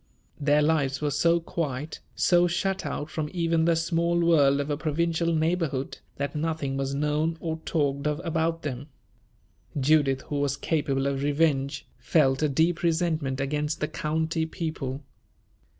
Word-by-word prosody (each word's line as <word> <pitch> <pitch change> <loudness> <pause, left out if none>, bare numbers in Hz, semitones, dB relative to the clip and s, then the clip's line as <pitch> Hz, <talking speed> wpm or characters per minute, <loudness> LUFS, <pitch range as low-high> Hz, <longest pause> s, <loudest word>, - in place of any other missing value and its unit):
Their 150 0 +3
lives 145 -3 +1
were 150 -1 -1
so 170 +4 +3
quiet, 155 -4 -4 0.2
so 175 -1 +4
shut 190 +2 -1
out 150 +2 -4
from 155 -2 -3
even 165 -2 +1
the 170 0 +3
small 170 +1 +1
world 145 -5 +4
of 145 +1 -2
a - - +1
provincial 165 +2 0
neighborhood, 160 -4 -1 0.2
that 140 +1 -3
nothing 150 -3 -2
was 135 0 -2
known 150 +3 0
or 160 -1 -3
talked 140 -2 0
of 150 +1 -1
about 165 0 -1
them. 140 -1 -4 0.9
Judith, 140 -1 +3
who 145 - -4
was 140 -1 0
capable 140 -4 0
of 140 -1 -1
revenge, 145 -1 +1
felt 135 -4 +2
a 155 - +2
deep 165 +5 +1
resentment 160 -5 0
against 150 +3 -1
the 150 - 0
county 160 +2 -1
people. 155 -5 -4
155 Hz, 150 wpm, -26 LUFS, 140-165 Hz, 0.9 s, so